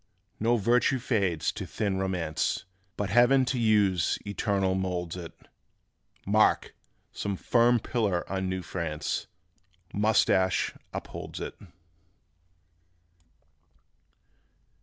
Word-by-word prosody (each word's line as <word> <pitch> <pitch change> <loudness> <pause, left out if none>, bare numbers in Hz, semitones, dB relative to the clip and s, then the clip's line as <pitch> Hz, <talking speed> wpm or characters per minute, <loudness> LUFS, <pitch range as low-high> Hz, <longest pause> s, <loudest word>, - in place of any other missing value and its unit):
No 115 +2 +3
virtue 120 +5 +3
fades 100 - 0
to - - -6
thin 100 -3 -1
romance 90 -5 -1 0.3
But 100 -2 -2
Heaven 120 +4 +5
to 125 0 -1
use 100 -6 +3
eternal 100 -2 0
moulds 90 -2 -2
it: 85 -2 -7 0.9
Mark! - - +3 0.4
Some 100 -1 -3
firm 120 +3 +3
pillar 105 -6 0
of 95 +1 -3
new 95 0 -2
France, 80 -5 -3 0.7
Moustache 100 -3 +2 0.2
upholds - - -7
it. - - -5
95 Hz, 95 wpm, -28 LUFS, 90-115 Hz, 0.9 s, Heaven